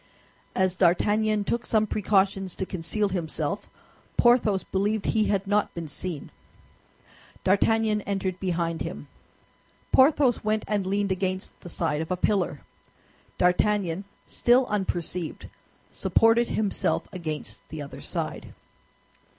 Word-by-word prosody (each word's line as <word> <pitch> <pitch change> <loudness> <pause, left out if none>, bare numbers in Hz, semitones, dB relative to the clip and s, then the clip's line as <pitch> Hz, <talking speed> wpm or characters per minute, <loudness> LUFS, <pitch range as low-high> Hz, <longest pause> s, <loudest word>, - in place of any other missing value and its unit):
As 185 -1 +2
D'Artagnan 205 +4 +2
took 235 +3 -1
some 215 -2 +2
precautions 195 -2 +1
to 190 - -3
conceal 190 +3 -1
himself, 175 -4 -3 0.5
Porthos 235 -5 +4
believed 205 +2 -1
he 215 -1 +2
had 200 -1 0
not 205 +1 +1
been 170 -2 -5
seen. 155 0 -5 1.1
D'Artagnan 215 +2 +2
entered 190 -2 -2
behind 170 -3 -1
him. - - -5 0.8
Porthos 265 -2 +4
went 215 0 0
and 205 -3 0
leaned 200 0 0
against 185 0 -2
the 175 - -10
side 150 -2 -1
of 160 - -5
a 185 - 0
pillar. 180 -7 0 0.8
D'Artagnan, 185 0 +2 0.2
still 245 +2 +3
unperceived, 180 -4 -3 0.4
supported 225 +1 +3
himself 210 -2 0
against 160 -4 -6
the 155 -2 -6
other 140 - -9
side. - - -4
195 Hz, 120 wpm, -26 LUFS, 180-215 Hz, 1.1 s, Porthos